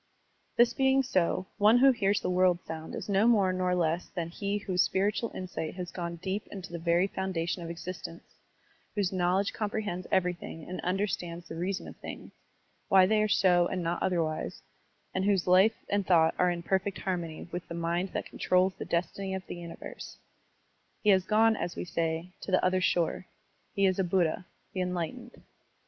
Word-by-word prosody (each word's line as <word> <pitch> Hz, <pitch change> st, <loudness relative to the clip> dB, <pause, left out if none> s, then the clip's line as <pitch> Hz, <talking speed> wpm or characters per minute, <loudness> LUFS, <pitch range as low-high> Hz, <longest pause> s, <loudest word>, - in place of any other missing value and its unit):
This 240 Hz, 0 st, +5 dB
being 265 Hz, +1 st, +3 dB
so, 185 Hz, -6 st, +1 dB
one 215 Hz, +3 st, +6 dB
who 270 Hz, +2 st, +7 dB
hears 205 Hz, -4 st, +1 dB
the -, -, -1 dB
world 180 Hz, -1 st, +3 dB
sound 160 Hz, 0 st, -6 dB
is -, -, -6 dB
no 200 Hz, +2 st, +3 dB
more 200 Hz, -6 st, +4 dB
nor 185 Hz, 0 st, +1 dB
less 170 Hz, 0 st, 0 dB
than 170 Hz, -2 st, -4 dB
he 200 Hz, +4 st, -2 dB
whose 185 Hz, -3 st, 0 dB
spiritual 200 Hz, +6 st, +1 dB
insight 175 Hz, -4 st, -5 dB
has 180 Hz, -2 st, -5 dB
gone 170 Hz, -1 st, -4 dB
deep 190 Hz, +4 st, -4 dB
into 195 Hz, -3 st, -8 dB
the 170 Hz, -, -5 dB
very 170 Hz, +2 st, +3 dB
foundation 185 Hz, -3 st, -2 dB
of 165 Hz, -, -6 dB
exist 175 Hz, +1 st, -6 dB
ence, 170 Hz, -, -12 dB, 0.7 s
whose 200 Hz, -4 st, +1 dB
knowledge 185 Hz, +2 st, +1 dB
comprehends 210 Hz, -4 st, -3 dB
everything 175 Hz, -3 st, -1 dB
and 185 Hz, -, -5 dB
understands 180 Hz, -2 st, -2 dB
the -, -, -7 dB
reason 185 Hz, +3 st, -3 dB
of -, -, -9 dB
things, -, -, -8 dB, 0.6 s
why 190 Hz, -1 st, +7 dB
they 215 Hz, +2 st, +3 dB
are 215 Hz, -, +2 dB
so 185 Hz, -5 st, +4 dB
and 180 Hz, -1 st, -3 dB
not 170 Hz, +1 st, -1 dB
otherwise, 160 Hz, -, -1 dB, 0.5 s
and 185 Hz, -, 0 dB
whose 200 Hz, -3 st, +2 dB
life 190 Hz, +5 st, +4 dB
and 200 Hz, -1 st, 0 dB
thought 165 Hz, -3 st, +5 dB
are 180 Hz, -, +4 dB
in 170 Hz, -1 st, -3 dB
perfect 190 Hz, +2 st, 0 dB
harmony 175 Hz, -5 st, -3 dB
with 175 Hz, 0 st, -5 dB
the 170 Hz, -, -6 dB
mind 170 Hz, +2 st, -1 dB
that -, -, -3 dB
controls 185 Hz, +1 st, +1 dB
the -, -, -4 dB
destiny 190 Hz, +3 st, -2 dB
of 190 Hz, -1 st, -6 dB
the -, -, -6 dB
universe. 170 Hz, -1 st, -9 dB, 0.9 s
He 210 Hz, -, +6 dB
has 190 Hz, -1 st, +4 dB
gone, 220 Hz, +2 st, +4 dB
as 175 Hz, -, -4 dB
we -, -, -4 dB
say, 165 Hz, +1 st, -2 dB
to -, -, -7 dB
the 185 Hz, -1 st, +3 dB
other 185 Hz, 0 st, +2 dB
shore, 175 Hz, 0 st, 0 dB, 0.5 s
he 200 Hz, -, +3 dB
is 185 Hz, 0 st, +2 dB
a -, -, +3 dB
Buddha, 180 Hz, -1 st, 0 dB, 0.3 s
the 185 Hz, -, -2 dB
enlightened. 180 Hz, +7 st, -4 dB
185 Hz, 190 wpm, -29 LUFS, 170-200 Hz, 0.9 s, who